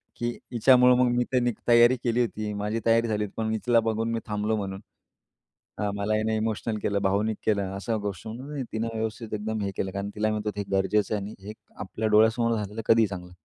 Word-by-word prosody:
की 120 - -2 0.2
"हिच्यामुळं 125 +1 +6
मग 125 0 +4
मी 125 - +3
तर 125 -1 +3 0.2
तयारी 120 +1 +6
केली 120 0 +1
होती, 110 -3 -2
माझी 105 +2 -2
तयारी 115 0 +3
झाली 105 -1 0
होती, 100 - -12
पण 110 - -1
मी 110 0 0
तिला 120 -1 +5
बघून 115 0 -1
मी 115 - -1
थांबलो 105 +1 -1
म्हणून. 95 -2 -4 1.0
हां. 105 -1 0
मला 100 +1 0
हिने 110 +1 0
इमोशनल 110 0 -2
केलं, 100 -1 +1
भावनिक 105 +3 +1
केलं." 100 -3 +1
अशा 110 +3 -2
गोष्टीवरून 110 +5 -6
म्हणून 145 -2 -4
तिनं 110 +1 -1
व्यवस्थित 110 0 -4
एकदम 110 +1 -3
हे 100 - -2
केलं. 95 - -2
कारण 100 +1 -4
तिला 110 +1 +1
म्हणत 105 0 -3
होतं 105 -1 -3
हे - - -1
गरजेचं 105 +2 +1
आहे 105 - -2
आणि 105 - -7
हे 105 - -5 0.2
आपल्या 110 - -3
डोळ्यासमोर 110 +2 +4
झालेलं 105 +1 -4
कधीही 115 -1 +5
चांगलं. 90 -2 -8
110 Hz, 215 wpm, -26 LUFS, 105-115 Hz, 1.0 s, हिच्यामुळं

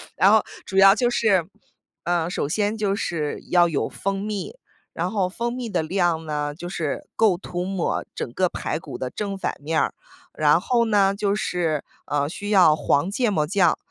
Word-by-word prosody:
然 195 +2 +5
后 220 - +6 0.2
主 190 - -4
要 195 +1 +8
就 245 +1 +2
是 205 -8 +2 0.6
呃， 175 -1 0
首 180 - -2
先 210 +7 0
就 200 -2 0
是 155 -6 -3
要 175 -1 +5
有 155 -4 -1
蜂 195 0 -3
蜜。 210 - -4 0.4
然 - - -2
后 195 -4 0
蜂 235 +5 -3
蜜 245 -2 -4
的 200 - 0
量 170 -1 0
呢， 150 -1 -2
就 175 +3 -8
是 165 -5 -4
够 210 -6 +3
涂 175 -1 -5
抹 190 -2 -1
整 120 - -5
个 185 +4 +1
排 - - -3
骨 150 -4 -8
的 130 - -4
正 200 +5 -4
反 - - -2
面 155 +2 0
儿， - - 0 0.4
然 - - +4
后 240 -2 +1
呢 200 -3 +3
就 200 0 0
是， 170 -7 -1 0.2
呃， 145 0 0
需 205 +6 -6
要 185 -7 +6
黄 150 +3 +1
芥 235 +3 0
末 155 -7 0
酱， 180 -2 +3
185 Hz, 205 characters per minute, -23 LUFS, 160-205 Hz, 0.6 s, 要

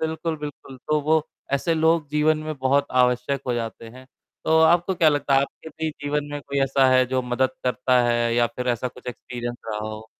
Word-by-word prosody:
बिल्कुल, 160 0 -2
बिल्कुल, 145 -2 -8
तो 150 +4 -1
वो 155 +2 +2 0.3
ऐसे 165 +4 +1
लोग 160 -1 +2
जीवन 155 +1 +2
में 155 0 -4
बहुत 140 +2 +2
आवश्यक 125 +2 +1
हो 125 - 0
जाते 115 -1 -5
हैं, 130 +3 -14 0.4
तो 160 0 +4
आपको 175 +3 +3
क्या 165 -2 +4
लगता 145 -2 +1
है 135 - +5
आपके 140 +3 -6
भी 160 0 -4
जीवन 145 0 -3
में 145 - -4
कोई 140 0 -4
ऐसा 135 0 +3
है 130 - +5
जो 130 +1 -1
मदद 125 +1 0
करता 125 0 +2
है 120 0 +1
या 120 0 +3
फिर 125 0 -2
ऐसा 120 +1 0
कुछ 125 0 -17
एक्सपीरियंस 120 0 -6
रहा 105 -1 -3
हो। 110 0 -8
135 Hz, 210 wpm, -23 LUFS, 125-155 Hz, 0.4 s, है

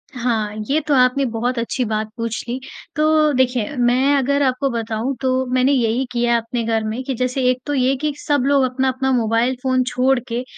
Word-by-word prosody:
हाँ, 225 -4 -1
ये 295 +3 +3
तो 295 - +2
आपने 255 +1 +3
बहुत 240 +3 -1
अच्छी 235 +2 -2
बात 215 0 -2
पूछ 230 -1 -3
ली। 245 +2 -3 0.4
तो 310 0 +3
देखिए 255 -1 0
मैं 255 +4 +3
अगर 280 +1 +1
आपको 260 +1 0
बताऊँ 230 +2 -2
तो 260 0 +1
मैंने 255 +2 +3
यही 245 -1 +1
किया 235 -1 +2
अपने 230 +1 -3
घर 225 -1 0
में 220 +3 -3
कि 265 0 -3
जैसे 255 +2 -1
एक 255 0 0
तो 290 - -2
ये 265 0 +2
कि 300 -1 -1
सब 290 -3 0
लोग 280 -1 +3
अपना, 260 +1 0
अपना 265 +1 -1
मोबाइल 235 +1 +1
फ़ोन 255 -1 +2
छोड़ 255 +1 +2
के 240 +1 -3
255 Hz, 205 wpm, -20 LUFS, 235-270 Hz, 0.4 s, ये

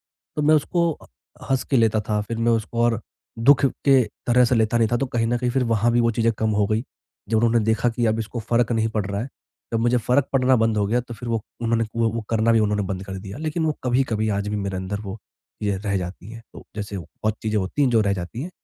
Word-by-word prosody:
तो 150 - -6
मैं 155 +1 +5
उसको 170 +3 +2
अ, - - -15 0.4
हँस 135 -1 +2
के 135 - +1
लेता 110 -2 +3
था, 105 -1 +1
फिर 115 +2 -5
मैं 115 0 +2
उसको 115 +1 -1
और 115 -1 +1 0.4
दुःख 140 +5 +5 0.2
के 135 -2 +6 0.2
तरह 125 +1 +5
से 125 +1 +2
लेता 110 +1 +2
नहीं 115 -1 +3
था - - +4
तो 135 +3 -1
कहीं 115 -2 -1
न 120 +1 +1
कहीं 125 0 0
फिर 130 +1 +1
वहाँ 115 0 +2
भी 120 - +3
वो 115 0 +3
चीज़ें 115 0 +1
कम 110 0 +1
हो 100 - +3
गई। 110 +2 0 0.5
जब 110 - +1
उन्होंने 115 0 +3
देखा 110 +2 +2
कि 115 0 0
अब 110 +1 +1
इसको 115 +2 -4
फ़र्क 120 +1 +1
नहीं 110 -1 +1
पड़ 110 -3 -2
रहा 100 0 -3
है, 125 - -4 0.4
जब 115 - +1
मुझे 120 +1 +2
फ़र्क 125 +4 +2
पड़ना 130 -1 +4
बंद 115 -1 +1
हो 100 - +1
गया 120 +4 +1
तो 120 -1 -9
फिर 120 +2 -8
वो 115 -2 -1 0.2
उन्होंने 115 0 +1
वो 115 -1 +2
वो 115 - -2
करना 115 +1 +3
भी 115 - +4
उन्होंने 105 -1 +1
बंद 95 +1 -5
कर 95 0 -5
दिया। 100 +5 -8
लेकिन 160 +1 -2
वो 155 - +2
कभी-कभी 120 -4 +1
आज 100 +1 -3
भी 105 - -2
मेरे 100 -2 -3
अंदर 95 +2 -4
वो 100 0 -6 0.5
चीज़ें 100 -2 0
रह 100 0 -1
जाती 90 +3 -6
हैं, 115 0 -10
तो - - -12
जैसे 100 -2 -4
बहुत 110 +4 -4
चीज़ें 110 -1 0
होती 95 +9 -1
हैं 135 - +3
जो 115 -2 +4
रह 100 -2 +2
जाती 95 +7 -5
हैं, 180 - -6
115 Hz, 265 wpm, -23 LUFS, 105-120 Hz, 0.5 s, के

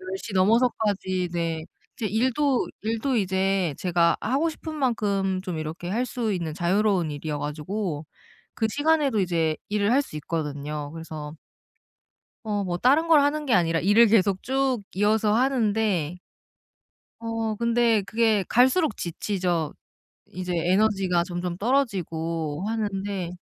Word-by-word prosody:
10 185 - -10
시 210 - -8
넘어서까지 200 -2 +2
이제 170 -2 -2 0.3
제 225 -5 -2
일도 255 +5 +1
일도 230 +4 -1
이제 190 -5 +1
제가 170 -2 +2
하고 275 +9 +1
싶은 315 0 -7
만큼 200 -8 0
좀 180 -4 -4
이렇게 155 +3 -5
할 240 +6 0
수 230 -4 -2
있는 170 -5 -3
자유로운 180 -1 +1
일이어 145 0 -4
가지고 155 +1 -4 0.5
그 225 - 0
시간에도 290 -4 +2
이제 165 -4 0
일을 210 +2 +1
할 280 +2 +4
수 260 - -13
있거든요. 150 -1 -4
그래서 160 -2 -7 1.1
어 205 -1 -1
뭐 180 -3 -2
다른 280 - +3
걸 315 -3 +7
하는 295 +1 0
게 250 - +3
아니라 165 -2 +2
일을 210 +5 +5
계속 200 -3 +2
쭉 265 -3 0
이어서 210 +2 +2
하는데 215 - +1 1.0
어 225 -1 -2
근데 235 -2 +2
그게 220 -1 +1
갈수록 260 - +3
지치죠. 175 -2 -2 0.6
이제 180 0 -4
에너지가 185 0 +2
점점 175 -1 -4
떨어지고 170 - -1
하는데. 200 -4 -2
200 Hz, 275 characters per minute, -25 LUFS, 170-230 Hz, 1.1 s, 걸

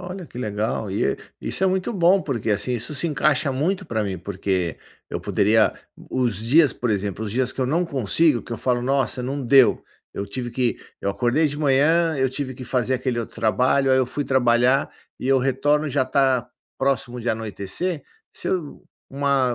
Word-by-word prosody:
Olha, 180 0 -7
que 120 - -10
legal! 105 -2 -2
E 100 - 0
é - - +1 0.2
isso - - -2
é - - +4
muito 190 +3 0
bom, 185 -1 +4
porque, 120 -6 -2
assim, 105 +5 0
isso 120 +5 -4
se 170 - -2
encaixa 145 -2 +1
muito 180 +9 -1
para 110 -2 -1
mim, 95 -2 -3
porque 95 -2 -2 0.3
eu - - -3
poderia 110 +2 +3 0.2
o 130 - -5
os 115 -6 0
dias 135 +5 +4
por 120 - -3
exemplo, 100 +1 -2
os 105 - -4
dias 130 +1 0
que - - -6
eu 130 - +1
não 165 +7 +1
consigo, 140 - +2
que - - -8
eu 115 - -4
falo: 125 +1 0
"Nossa, 135 -1 0
não 135 +3 -3
deu. 130 +1 +5 0.3
Eu 100 - -3
tive 120 +4 -5
que 120 0 -1 0.2
eu 100 - -1
acordei 125 +9 +1
de 145 0 -3
manhã, 155 +3 +3
eu 130 -1 +1
tive 130 0 -4
que 130 - -8
fazer 125 +1 0
aquele 130 -1 -1
outro 115 - -5
trabalho, 130 +5 +2
aí 130 - +5
eu 130 - +2
fui 145 +3 -3
trabalhar 125 +1 +3 0.3
e - - -4
eu 135 0 +5
retorno 145 +4 +1
e - - -3
já 135 -1 +1
tá 130 -2 +1 0.3
próximo 130 -2 -1
de 120 - -3
anoitecer". 110 - -3 0.3
Se - - -8
eu 170 -6 -3 0.3
uma 135 -2 +1
130 Hz, 205 wpm, -23 LUFS, 115-145 Hz, 0.3 s, deu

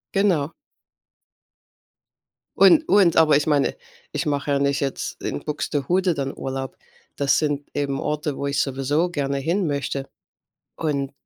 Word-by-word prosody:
Genau. 170 -7 +2 2.0
Und 315 -2 +6
und 195 -5 +4
aber 155 -3 +6
ich 145 +2 +1
meine 145 -2 +2 0.4
ich - - -2
mache 145 -1 -1
ja 140 - +2
nicht 140 0 +1
jetzt 140 -2 -4
in 70 - -4
Buxtehude 165 +5 0
dann 135 -2 -3
Urlaub. 135 -1 -5 0.4
Das 140 -1 +3
sind 145 -2 -1
eben 140 -1 -1
Orte, 150 -1 -2
wo 140 - -2
ich 140 0 +1
sowieso 140 +6 0
gerne 140 -4 -2
hin 170 +5 0
möchte. 140 -1 -2 0.7
Und 140 -4 -2
145 Hz, 140 wpm, -23 LUFS, 140-160 Hz, 2.0 s, Und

